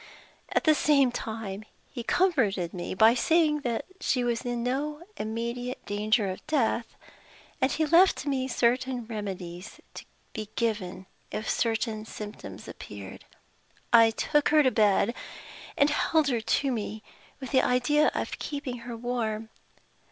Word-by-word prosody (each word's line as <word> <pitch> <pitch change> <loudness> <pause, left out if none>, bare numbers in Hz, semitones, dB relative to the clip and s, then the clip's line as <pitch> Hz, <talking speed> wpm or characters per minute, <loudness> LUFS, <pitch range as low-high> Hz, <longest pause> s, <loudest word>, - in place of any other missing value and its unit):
At - - +1
the 310 - +6
same 280 -4 +3
time, 220 -4 -5 0.3
he 240 - -5
comforted 230 - +1
me 180 0 -4
by 220 +4 +6
saying 310 +3 +3
that 235 -4 -2
she 260 -10 +1
was 240 -1 0
in 240 -1 -2
no 295 +5 -2
immediate 235 +3 -4
danger 210 +1 +1
of 185 - -10
death; 240 -6 0 0.7
and 260 - +3
he 315 - +1
left 340 +3 +4
me 265 -2 0
certain 250 0 0
remedies 195 -4 -6
to - - -9 0.3
be 215 -2 -5
given, 200 -5 -2 0.2
if 215 - -4
certain 225 -1 -1
symptoms 210 -1 -8
appeared. - - -9 0.7
I 230 -1 +8
took 295 +6 +1
her 305 0 +5
to 260 - +3
bed, 210 +1 +3 0.6
and 285 +1 +4
held 310 0 +2
her 235 -3 0
to 270 +5 +1
me, 215 -2 -4 0.4
with 265 - -7
the 260 - +5
idea 255 +5 +3
of - - -3
keeping 280 -4 -4
her 235 0 -7
warm. 225 -2 -2
240 Hz, 145 wpm, -28 LUFS, 215-275 Hz, 0.7 s, I